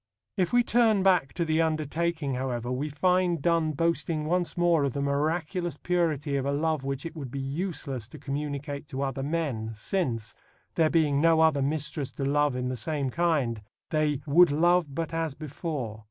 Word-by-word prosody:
If 180 Hz, -2 st, 0 dB
we 245 Hz, 0 st, +4 dB
turn 225 Hz, -4 st, +3 dB
back 180 Hz, -8 st, +3 dB
to 170 Hz, -, -1 dB
The 160 Hz, 0 st, +2 dB
Undertaking, 160 Hz, -1 st, -1 dB
however, 125 Hz, -2 st, -2 dB
we 140 Hz, +4 st, -2 dB
find 180 Hz, +3 st, +2 dB
Donne 165 Hz, 0 st, +1 dB
boasting 165 Hz, 0 st, 0 dB
once 175 Hz, +2 st, 0 dB
more 170 Hz, -3 st, +3 dB
of 140 Hz, -3 st, 0 dB
the 140 Hz, -, -2 dB
miraculous 160 Hz, +5 st, -1 dB
purity 155 Hz, -5 st, 0 dB
of 135 Hz, -, -2 dB
a -, -, +1 dB
love 155 Hz, 0 st, 0 dB
which 135 Hz, +1 st, -3 dB
it 165 Hz, -, -6 dB
would 140 Hz, -5 st, -6 dB
be 140 Hz, -, -6 dB
useless 135 Hz, -, -3 dB
to 155 Hz, -, -11 dB
communicate 145 Hz, 0 st, -4 dB
to 135 Hz, -2 st, -3 dB
other 135 Hz, -1 st, -2 dB
men, 135 Hz, -7 st, -2 dB
since, 115 Hz, -, -2 dB, 0.4 s
there 160 Hz, -2 st, +3 dB
being 150 Hz, -4 st, +2 dB
no 165 Hz, 0 st, +5 dB
other 160 Hz, -3 st, +4 dB
mistress 145 Hz, 0 st, -2 dB
to 135 Hz, -, -3 dB
love 145 Hz, -1 st, +2 dB
in 125 Hz, 0 st, -2 dB
the 130 Hz, -, -2 dB
same 140 Hz, 0 st, -2 dB
kind, 145 Hz, -10 st, 0 dB, 0.3 s
they 150 Hz, -2 st, +1 dB
"would 165 Hz, +4 st, +6 dB
love 170 Hz, -1 st, +2 dB
but 165 Hz, +1 st, -3 dB
as 165 Hz, -3 st, -2 dB
before." 145 Hz, -7 st, -5 dB
150 Hz, 185 wpm, -27 LUFS, 140-165 Hz, 0.4 s, would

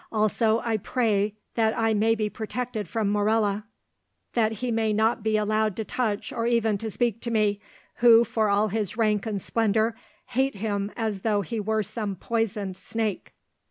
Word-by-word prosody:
Also, 220 Hz, +1 st, +2 dB
I 225 Hz, -2 st, 0 dB
pray 210 Hz, -2 st, 0 dB, 0.2 s
that 225 Hz, 0 st, +1 dB
I 225 Hz, -1 st, +2 dB
may 220 Hz, +2 st, +3 dB
be 215 Hz, -1 st, -1 dB
protected 220 Hz, 0 st, -4 dB
from 215 Hz, -3 st, 0 dB
Morella, 210 Hz, 0 st, +1 dB, 0.7 s
that 220 Hz, -2 st, +2 dB
he 245 Hz, +3 st, -3 dB
may 220 Hz, -1 st, +1 dB
not 220 Hz, +2 st, +2 dB
be 215 Hz, 0 st, +1 dB
allowed 215 Hz, -1 st, +1 dB
to 220 Hz, -, -3 dB
touch 215 Hz, -4 st, -2 dB
or 230 Hz, 0 st, -1 dB
even 225 Hz, -3 st, +2 dB
to 225 Hz, -, -4 dB
speak 230 Hz, 0 st, -1 dB
to 235 Hz, -, -3 dB
me, 210 Hz, -3 st, +1 dB, 0.4 s
who, 235 Hz, -1 st, +7 dB
for 220 Hz, -2 st, 0 dB
all 205 Hz, +2 st, +2 dB
his 215 Hz, 0 st, -2 dB
rank 215 Hz, -2 st, +1 dB
and 210 Hz, -2 st, -2 dB
splendour, 220 Hz, +2 st, +1 dB, 0.4 s
hate 265 Hz, +1 st, +1 dB
him 205 Hz, 0 st, -2 dB
as 215 Hz, -4 st, -2 dB
though 210 Hz, -1 st, +1 dB
he 215 Hz, +5 st, -4 dB
were 215 Hz, +1 st, 0 dB
some 210 Hz, -1 st, -4 dB
poisoned 210 Hz, -3 st, -2 dB
snake." 220 Hz, -2 st, -3 dB
220 Hz, 175 wpm, -26 LUFS, 210-225 Hz, 0.7 s, who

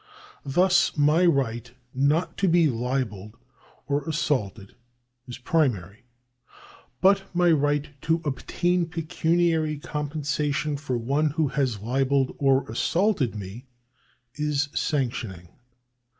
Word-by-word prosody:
Thus 180 Hz, +4 st, +3 dB
my 150 Hz, +5 st, +4 dB
right 125 Hz, -6 st, 0 dB, 0.2 s
not 145 Hz, +6 st, +1 dB
to 195 Hz, -, +1 dB
be 170 Hz, -2 st, +4 dB
libelled 115 Hz, -5 st, -3 dB, 0.5 s
or 140 Hz, +2 st, 0 dB
assaulted 115 Hz, -11 st, -2 dB, 0.5 s
is 125 Hz, -, -7 dB
primary; 120 Hz, -, -1 dB, 1.0 s
but 195 Hz, +1 st, +4 dB
my 175 Hz, -1 st, +4 dB
right 145 Hz, -1 st, +1 dB
to 165 Hz, +1 st, +1 dB
obtain 175 Hz, +5 st, 0 dB
pecuniary 165 Hz, -1 st, 0 dB
compensation 150 Hz, 0 st, -2 dB
from 130 Hz, -5 st, -4 dB
one 145 Hz, +4 st, +2 dB
who 155 Hz, 0 st, 0 dB
has 130 Hz, -7 st, -1 dB
libelled 135 Hz, +3 st, +1 dB
or 135 Hz, -1 st, +2 dB
assaulted 160 Hz, -, 0 dB
me 105 Hz, +6 st, -8 dB, 0.7 s
is 150 Hz, -1 st, -1 dB
sanctioning. 115 Hz, -, -2 dB
145 Hz, 105 wpm, -25 LUFS, 125-160 Hz, 1.0 s, my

